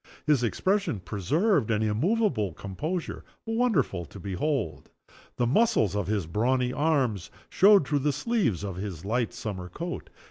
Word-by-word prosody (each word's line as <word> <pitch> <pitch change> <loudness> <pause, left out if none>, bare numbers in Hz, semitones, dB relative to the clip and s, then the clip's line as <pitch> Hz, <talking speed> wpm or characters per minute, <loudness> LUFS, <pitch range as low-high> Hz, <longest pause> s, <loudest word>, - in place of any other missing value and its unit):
His 150 -5 +3
expression 190 - 0
preserved 115 - +1
an 110 -1 +1
immovable 115 - +1
composure 150 - -4 0.2
wonderful 225 - +1
to 90 +7 -12
behold. 105 - -2 0.5
The 120 - +1
muscles 120 - +2
of 100 -4 -1
his 100 -4 0
brawny 125 +8 0
arms 130 - 0 0.2
showed 200 -5 +5
through 145 -1 +1
the 145 +2 +1
sleeves 145 - 0
of 95 -3 -4
his 95 -4 -6
light 115 +3 0
summer 95 -4 -6
coat. 170 - -6
120 Hz, 140 wpm, -27 LUFS, 100-165 Hz, 0.5 s, showed